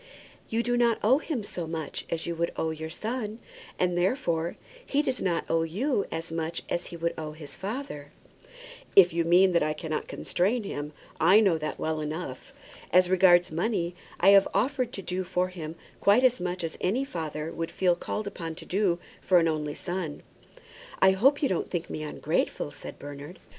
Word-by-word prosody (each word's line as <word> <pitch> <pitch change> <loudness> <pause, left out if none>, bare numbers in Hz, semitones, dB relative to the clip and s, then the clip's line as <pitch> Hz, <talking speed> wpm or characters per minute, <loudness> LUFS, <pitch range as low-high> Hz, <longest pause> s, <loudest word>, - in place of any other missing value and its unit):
"You 230 +1 +1
do 245 +1 +1
not 235 -2 +3
owe 255 +7 +5
him 295 -8 -3
so 175 -4 -4
much 160 -3 -5
as 165 -1 -2
you 170 - -2
would 170 0 0
owe 160 - -1
your 160 0 -5
son; 220 +4 -4 0.4
and, 180 -1 +1
therefore, 175 - 0 0.3
he 290 - +1
does 260 -3 -1
not 175 -3 0
owe 165 - +2
you 200 - 0
as 165 0 -4
much 165 0 -3
as 175 - -2
he 170 - -8
would 170 0 -1
owe 155 -1 -5
his 150 -2 -7
father." 195 - -5 0.8
"If 180 -4 +8
you 170 0 +1
mean 180 +3 +5
that 170 - +4
I 155 0 +1
cannot 155 0 -4
constrain 210 +6 0
him, 150 -6 -5 0.3
I 185 +6 +7
know 190 -7 +3
that 155 0 -3
well 160 -1 -2
enough. 150 -3 -5 0.4
As 180 +1 +5
regards 180 -2 +5
money, 175 0 -1 0.3
I 190 - +6
have 200 -1 +7
offered 255 -1 +1
to 195 - -6
do 185 +1 -2
for 180 0 0
him 165 -3 -7 0.2
quite 205 +6 +5
as 250 -1 +4
much 180 0 -3
as 165 - -4
any 235 +9 +1
father 160 - -4
would 165 0 -3
feel 180 -2 +2
called 210 +4 -4
upon 165 -5 -5
to - - -10
do 190 -2 +1 0.2
for 185 - +4
an 165 -1 +4
only 150 -2 -2
son." 175 -5 -4 0.8
"I 190 - +7
hope 270 +10 +3
you - - +5
don't 185 - -1
think 175 -2 -3
me - - -4
ungrateful," 150 - -1
said - - -9
Bernard. 145 +4 -9
175 Hz, 195 wpm, -28 LUFS, 160-200 Hz, 0.8 s, If